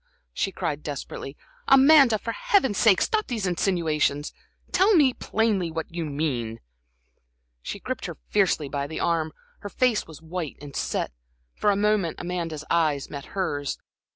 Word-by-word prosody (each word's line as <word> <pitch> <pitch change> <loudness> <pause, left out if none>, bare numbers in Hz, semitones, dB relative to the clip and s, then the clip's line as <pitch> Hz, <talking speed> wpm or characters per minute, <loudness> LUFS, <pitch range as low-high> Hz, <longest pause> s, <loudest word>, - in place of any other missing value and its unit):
she 195 - -1
cried, 150 -4 -3
desperately. 140 -1 -6 0.3
"Amanda, 270 -3 +7
for 230 - -4
Heaven's 395 - +2
sake, 210 -5 +5
stop 435 -1 0
these 225 -6 -2
insinuations! 160 -5 0 0.4
Tell 400 +2 +4
me 280 -6 +5
plainly 210 -8 0
what 160 +1 -5
you 170 -1 -2
mean?" 140 -7 -2 1.0
She - - -6
gripped - - -4
her - - -7
fiercely 145 - +2
by 140 +1 -3
the 160 - -5
arm, 160 -2 0 0.3
her 205 - -7
face 245 0 +1
was 160 -3 -11
white 165 -1 -5
and 145 -1 -10
set. - - -2 0.4
For 210 - +1
a 200 - +3
moment 205 -4 +1
Amanda's 170 -4 -4
eyes 155 -5 +1
met 140 -1 -6
hers. 145 -7 -1
170 Hz, 155 wpm, -25 LUFS, 150-215 Hz, 1.0 s, Amanda